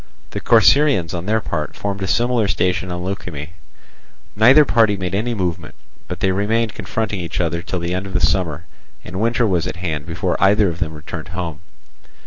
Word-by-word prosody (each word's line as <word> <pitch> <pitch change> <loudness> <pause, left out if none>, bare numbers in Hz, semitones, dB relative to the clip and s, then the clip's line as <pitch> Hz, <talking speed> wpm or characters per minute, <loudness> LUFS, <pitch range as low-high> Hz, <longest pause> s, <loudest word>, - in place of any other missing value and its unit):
The - - -3
Corcyraeans 110 - +4
on 90 +1 -4
their 110 +1 +2
part 75 -7 -4
formed 100 -1 -4
a 95 - -1
similar 120 0 +1
station 90 -1 0
on 90 0 -4
Leukimme. 90 -5 -5 0.9
Neither 130 +8 +7
party 110 -5 +3
made 90 -2 -4
any 115 +4 -1
movement, 85 -5 -3 0.3
but - - -6
they 95 - +2
remained 110 +3 0
confronting 105 0 -3
each 85 -2 -4
other 85 -1 0
till 90 +1 -4
the 85 0 -2
end 95 +1 -3
of 95 - -9
the 90 - +1
summer, 85 0 0 0.4
and 95 +3 -5
winter 115 +1 +2
was 90 -4 +1
at - - -4
hand 80 -4 -4
before 80 -1 -2
either 100 0 +4
of 85 0 -6
them 80 -1 -3
returned 80 +1 -7
home. 85 -4 -4
95 Hz, 190 wpm, -20 LUFS, 85-105 Hz, 0.9 s, Neither